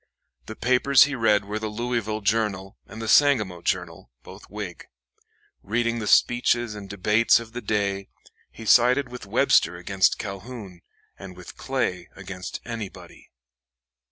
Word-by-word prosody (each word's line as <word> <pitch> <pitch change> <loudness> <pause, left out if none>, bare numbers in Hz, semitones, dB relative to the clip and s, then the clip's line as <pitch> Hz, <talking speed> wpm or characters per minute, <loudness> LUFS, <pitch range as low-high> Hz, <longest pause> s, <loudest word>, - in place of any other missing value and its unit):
The 110 - -7
papers 130 +3 +4
he 145 - -1
read 105 -5 +2
were 105 +2 -4
the 110 - -4
Louisville 110 -1 -3
"Journal" 100 -2 -1
and 110 - -10
the 110 - -5
"Sangamo 110 - +3
Journal," - - -3
both - - -13
Whig. 105 -4 -7 0.7
Reading 115 +2 -1
the 105 - -4
speeches 120 -1 +2
and 100 -2 -9
debates 105 +4 +3
of 115 -1 -11
the 120 - -5
day, 100 -3 -2 0.4
he 110 - -12
sided 125 +4 +4
with 125 -4 -9
Webster 105 -6 +3
against 95 +2 +1
Calhoun, 100 -2 -8 0.4
and 95 -2 -10
with 90 - -11
Clay 105 -10 -3
against 95 -1 -7
anybody. 115 -5 -9
110 Hz, 140 wpm, -24 LUFS, 100-120 Hz, 0.7 s, papers